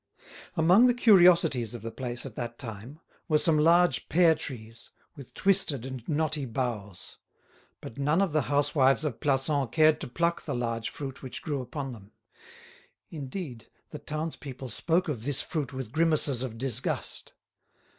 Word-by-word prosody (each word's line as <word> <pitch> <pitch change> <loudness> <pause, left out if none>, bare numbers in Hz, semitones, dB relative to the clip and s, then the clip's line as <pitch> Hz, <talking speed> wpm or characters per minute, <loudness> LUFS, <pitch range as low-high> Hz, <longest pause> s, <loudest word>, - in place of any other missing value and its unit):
Among 180 +9 +6
the 245 - +3
curiosities 170 - +5
of 115 - -9
the 115 - -5
place 120 0 -5
at 135 - -7
that 120 0 -6
time 120 +4 -8 0.3
were 155 -3 +3
some 155 0 +2
large 170 +3 +3
pear 170 -1 +5
trees, 115 -6 -8 0.3
with 140 -5 -12
twisted 190 - +2
and 130 -2 -6
knotty 155 -2 0
boughs; 115 -6 -4 0.6
but 115 - -9
none 150 +5 +2
of 195 -4 +1
the 155 - +3
housewives 145 0 +3
of 135 -7 -3
Plassans 140 -2 +1
cared 155 0 +4
to - - -3
pluck 170 +7 -1
the 140 - -4
large 115 -2 -2
fruit 135 -2 -7
which 130 - -7
grew 145 -4 -2
upon 135 +1 -5
them. 105 -3 -13 1.0
Indeed, 140 - -7 0.2
the 150 - -7
townspeople 150 -4 -6
spoke 170 - 0
of 130 -8 -4
this 140 +1 -1
fruit 155 -5 -3
with 130 -4 -6
grimaces 155 -4 +2
of 120 -4 -5
disgust. 130 -1 -2
140 Hz, 155 wpm, -28 LUFS, 120-160 Hz, 1.0 s, Among